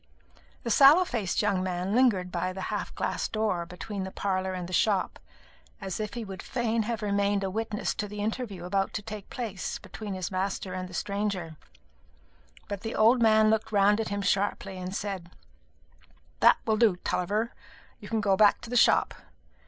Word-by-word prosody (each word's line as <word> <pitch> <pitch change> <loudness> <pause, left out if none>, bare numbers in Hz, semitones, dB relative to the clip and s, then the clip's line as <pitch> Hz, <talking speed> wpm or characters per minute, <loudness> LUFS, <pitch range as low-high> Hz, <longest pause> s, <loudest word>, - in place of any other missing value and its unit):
The 235 - -2
sallow 290 - +7
faced 215 - -1
young 200 -3 +1
man 185 +1 -2
lingered 215 -8 +3
by 185 0 -2
the 190 0 -4
half - - -3
glass - - -1
door 210 -6 -1
between 190 +3 -6
the 190 - -4
parlour 190 -1 -2
and 180 -1 -5
the 185 - -8
shop, 200 0 +1 0.6
as 195 -1 -5
if 215 +1 -4
he 235 -2 -4
would 190 -2 -7
fain 230 -3 -1
have 230 -2 -2
remained 200 0 +1
a 190 - -2
witness 215 0 -2
to 210 - -3
the 210 +1 -8
interview 210 -4 -3
about 195 +1 0
to 210 - -4
take 210 -2 -8
place 220 -7 -4
between 210 -3 -7
his 185 0 -4
master 190 0 -2
and 185 0 -5
the 180 - -9
stranger; 200 -5 -2 1.1
but 200 -1 -5
the 225 0 -4
old 230 +3 +5
man 220 -1 +5
looked 220 0 0
round 205 +1 +4
at 220 - -4
him 200 0 -2
sharply, 195 -1 0
and 185 +1 -5
said, 195 -5 -4 1.1
"That - - +6
will 220 -1 +2
do, 215 -5 +4
Tulliver; 210 +6 -1 0.5
you - - -10
can 225 -1 0
go 200 -2 +3
back 205 +1 +5
to 235 - -9
the - - -2
shop. - - +4
205 Hz, 185 wpm, -28 LUFS, 190-220 Hz, 1.1 s, sallow